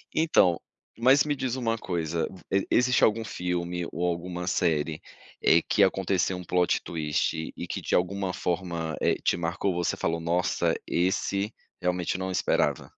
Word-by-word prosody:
Então, 125 - +4 0.4
mas 130 +4 +5
me 145 -1 -1
diz 130 -2 -2
uma 115 -3 -1
coisa, 85 -5 -2 0.4
existe 125 +1 +3
algum 110 +1 +3
filme 90 -2 -3
ou 90 - -2
alguma 90 0 -3
série, 80 -4 0 0.4
eh, 85 - +5
que 100 - +4
aconteceu 95 -1 +1
um 90 - -7
plot 90 +1 +1
twist 80 0 -2
e - - -5
que, - - -4
de - - 0
alguma 95 +1 0
forma, 85 -3 -2
eh, - - +3
te - - +2
marcou? 85 +3 -1
Você 85 -1 0
falou: 85 0 -1
"Nossa, 85 +2 +1
esse 100 +3 0 0.3
realmente 90 0 0
eu - - -3
não 95 0 -2
esperava". - - 0
90 Hz, 155 wpm, -27 LUFS, 85-100 Hz, 0.4 s, mas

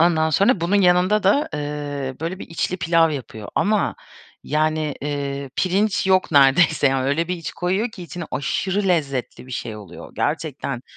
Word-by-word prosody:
Ondan 160 -2 +3
sonra 200 - +3
bunun 175 +5 +2
yanında 180 +4 +4
da, 210 +10 +3
eee, 145 -2 -4
böyle, 170 +3 -3
bir - - -8
içli 170 +2 -2
pilav 165 -1 +3
yapıyor 115 -7 -6
ama, 210 0 +1 0.5
yani, 155 0 0
eee, 140 -1 -3
pirinç 195 +2 +1
yok 185 -3 +3
neredeyse. 145 +2 +5
Yani, 135 -1 0
öyle 160 +4 0
bir 180 - -1
iç 165 - -6
koyuyor 190 +6 -1
ki 200 -5 -10
içine 175 +1 -6
aşırı 190 +9 -1
lezzetli 140 -8 -1
bir - - -13
şey 110 -2 -4
oluyor. 100 -5 -11
Gerçekten 145 -4 -2
160 Hz, 165 wpm, -22 LUFS, 140-180 Hz, 0.5 s, neredeyse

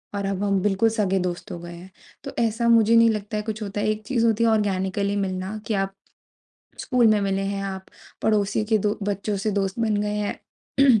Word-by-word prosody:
और 200 -1 -2
अब 195 0 -2
हम 200 -2 +1
बिल्कुल 205 +3 +2
सगे 200 -4 0
दोस्त 180 -1 -4
हो 175 - -5
गए 175 0 -9
हैं। 180 +2 -12 0.3
तो - - -7
ऐसा 230 +1 0
मुझे 230 -1 +5
नहीं 230 0 +6
लगता 210 -1 -2
है 210 - -2
कुछ 215 0 -5
होता 205 0 -3
है 215 - +1
एक 215 0 -2
चीज़ 235 -3 +1
होती 225 0 +2
है 230 - +4
ऑर्गेनिकली 200 -1 0
मिलना 190 +1 -2
कि 225 - 0
आप 195 -1 +1
ऑर्गेनिकली 195 0 -36 0.7
स्कूल 250 -3 +3
में 215 -1 +4
मिले 195 -1 0
हैं 195 0 -2
आप 190 -1 -5 0.4
पड़ोसी 210 0 +1
के 220 0 +2
दो 210 +1 -1
बच्चों 200 +1 -2
से 195 +2 -1
दोस्त 195 +1 -1
बन 220 -2 +1
गए 210 0 -2
हैं। 230 +4 +1
205 Hz, 225 wpm, -24 LUFS, 195-220 Hz, 0.7 s, नहीं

